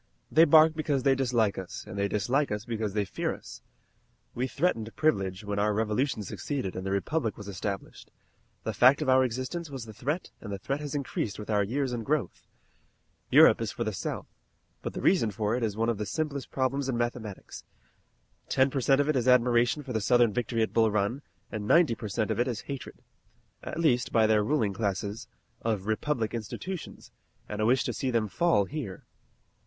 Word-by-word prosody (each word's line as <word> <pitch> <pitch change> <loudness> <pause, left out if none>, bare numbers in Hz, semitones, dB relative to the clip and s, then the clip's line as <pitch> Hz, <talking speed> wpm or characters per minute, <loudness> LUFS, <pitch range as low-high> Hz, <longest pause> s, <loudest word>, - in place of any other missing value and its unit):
"They 160 +3 +7
bark 155 +1 +7
because 150 -4 -1
they 135 -1 +5
dislike 120 -7 +1
us, 95 - -7
and - - -9
they 100 0 0
dislike 120 +8 0
us 105 +1 -3
because 110 -3 -3
they 105 -1 +1
fear - - -2
us. - - -12 0.7
We 125 +2 -1
threatened 125 -7 -1
Privilege 100 -10 0
when 100 0 -2
our 105 0 +2
Revolution 110 +2 0
succeeded 130 0 -4
and 95 - -4
the 95 - -3
Republic 110 +5 -1
was 105 - -9
established. 100 0 -5 0.5
The 110 - -2
fact 130 +8 +5
of 135 - -1
our 130 0 +6
existence 130 +7 -3
was 135 -4 -6
the 110 - -10
threat 150 - -3
and 105 - -7
the 100 - -3
threat 135 +9 -3
has 150 -1 -5
increased 130 -7 -3
with 105 +1 -6
our 105 -1 +3
years 130 +5 -1
and 115 -2 -3
growth. 140 - -2 0.8
Europe - - +7
is - - -2
for - - -3
the - - -2
South, - - -4 0.6
but - - -5
the - - -5
reason 175 - +4
for 105 +2 -1
it 125 - -2
is 110 -3 -1
one 115 +1 +1
of 115 -3 0
the 105 - -3
simplest 145 +4 -3
problems 135 +1 -1
in 120 - 0
mathematics. 120 -4 -4 0.9
Ten 135 0 +3
per 135 - -1
cent 135 +2 +4
of 145 - +2
it 155 - +2
is 125 -1 0
admiration 125 +2 +4
for 130 -2 -6
the 110 - 0
Southern 120 0 +4
victory 115 -1 0
at - - -3
Bull 110 -1 +4
Run, 105 +6 0 0.3
and 105 -2 -4
ninety 165 -4 +5
per 110 - -6
cent 110 +1 -1
of - - -1
it 120 - +2
is 120 -3 -3
hatred 140 -3 -8 0.6
at - - -5
least 125 -7 +2
by 115 -1 +4
their 110 -1 +3
ruling 110 -4 +1
classes 100 +2 -3 0.3
of 110 -4 -1
republican 115 +1 -1
institutions, 165 - -7 0.4
and 105 0 -4
a 110 - +2
wish 130 +2 +3
to - - -2
see 135 - -2
them 115 -3 +1
fall 105 - +2
here." 130 -7 -6
120 Hz, 205 wpm, -28 LUFS, 105-135 Hz, 0.9 s, They